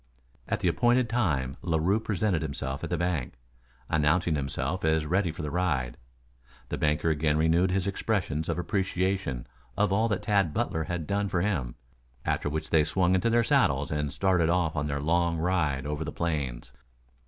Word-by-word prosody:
At - - -1
the - - +1
appointed 120 +8 +3
time 75 - 0
Larue 85 +5 +1
presented 105 -5 0
himself 70 -3 -4
at - - -3
the - - 0
bank, 85 -9 -2 0.5
announcing 80 +3 +2
himself 70 +4 -2
as 80 -1 +2
ready 90 +2 +1
for 80 +1 -7
the 75 - -3
ride. 75 -9 0 0.7
The - - -2
banker 75 +1 +1
again 75 0 +1
renewed 80 +4 +3
his 90 0 0
expressions 95 -6 -1
of - - -1
appreciation 95 -6 -1 0.3
of 105 -1 +2
all 110 +3 +3
that 100 -4 -2
Tad 100 -8 +1
Butler 80 -1 -1
had 85 -1 -3
done 100 +4 0
for 90 -3 0
him, 80 -12 -1 0.5
after - - 0
which 80 +1 -4
they 80 -2 +5
swung 90 +3 +1
into 95 +5 +2
their 120 0 +3
saddles 70 -8 +2
and 75 -1 -1
started 90 -3 +2
off 85 -2 +1
on 75 -1 -1
their 70 -1 -2
long 85 +3 +1
ride 80 -6 0
over 75 +1 -2
the 75 - -5
plains. 75 -8 -3
85 Hz, 175 wpm, -28 LUFS, 75-95 Hz, 0.7 s, they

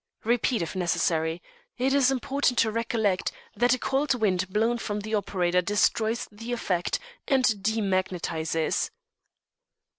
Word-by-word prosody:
Repeat 235 -2 +1
if 165 - -6
necessary. 165 -2 0 0.3
It 260 +2 +1
is 275 -2 +4
important 270 -1 0
to 220 - +3
recollect 220 -4 0 0.2
that 245 +1 +3
a - - -6
cold 270 +2 +1
wind 185 -5 0
blown 225 +4 +1
from 210 -2 -3
the 215 +2 -6
operator 180 -3 +1
destroys 220 +4 +1
the 225 +3 -7
effect 185 -7 -1 0.3
and 265 -2 +3
demagnetises." 185 -7 0
215 Hz, 125 wpm, -27 LUFS, 185-240 Hz, 0.3 s, is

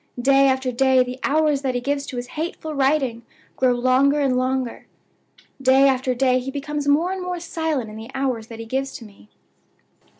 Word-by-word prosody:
Day 275 +2 +4
after 260 -1 0
day 260 +1 +3
the 250 +1 -7
hours 300 -1 +2
that 260 -2 -2
he - - +1
gives 280 +2 -2
to 255 - -6
his 245 0 -5
hateful 315 0 -4
writing 270 -4 +1 0.3
grow 255 -1 +2
longer 255 +4 +3
and 270 -3 +1
longer; 255 -1 -2 0.7
day 265 +1 +5
after 260 -1 +1
day 255 0 +2
he 255 +1 -5
becomes 290 +1 -4
more 315 +6 +3
and 380 0 -4
more 360 -1 -4
silent 320 -7 -2
in 215 - -9
the 220 +2 -9
hours 255 -5 -2
that 230 - -9
he 225 - -7
gives 265 +3 -3
to 230 - -9
me. 200 - -18
265 Hz, 195 wpm, -22 LUFS, 250-285 Hz, 0.7 s, day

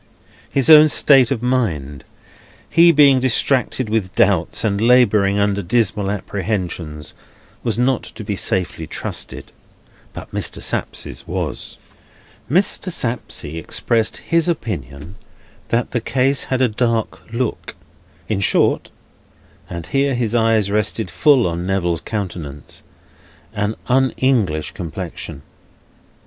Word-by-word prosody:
His 135 -2 +1
own 155 -1 +9
state 135 -4 +5
of 120 -4 -2
mind, 80 - -1 0.6
he 170 +1 +6
being 140 -4 +5
distracted 130 0 +1
with 105 -4 -2
doubts, 100 -7 +2
and 100 -2 0
labouring 110 -5 +4
under 100 0 +1
dismal 105 0 0
apprehensions, 90 -6 -4 0.5
was 115 -2 -1
not 125 0 +1
to 110 - -9
be 100 0 -3
safely 90 -4 -1
trusted; - - -4 0.6
but - - -10
Mr. - - -2
Sapsea's - - -3
was. - - -4 0.7
Mr. 185 +3 +1
Sapsea 115 - -3
expressed 110 +7 -1
his 165 0 0
opinion 85 - -4 0.5
that 120 +1 -1
the 120 - -1
case 135 +3 0
had 130 0 0
a - - +4
dark 115 0 -2
look; 120 0 -3 0.5
in 105 -3 -1
short 100 - +2 0.8
(and 85 -2 -6
here 135 -1 0
his 120 -2 -1
eyes 110 -3 +2
rested 105 -2 -1
full 130 - +4
on 85 0 -2
Neville's 90 -4 -1
countenance), 85 -9 -6 0.7
an 105 +1 -2
Un 130 +1 +2
English 100 - +1
complexion. 80 -5 -7
110 Hz, 120 wpm, -19 LUFS, 90-125 Hz, 0.8 s, own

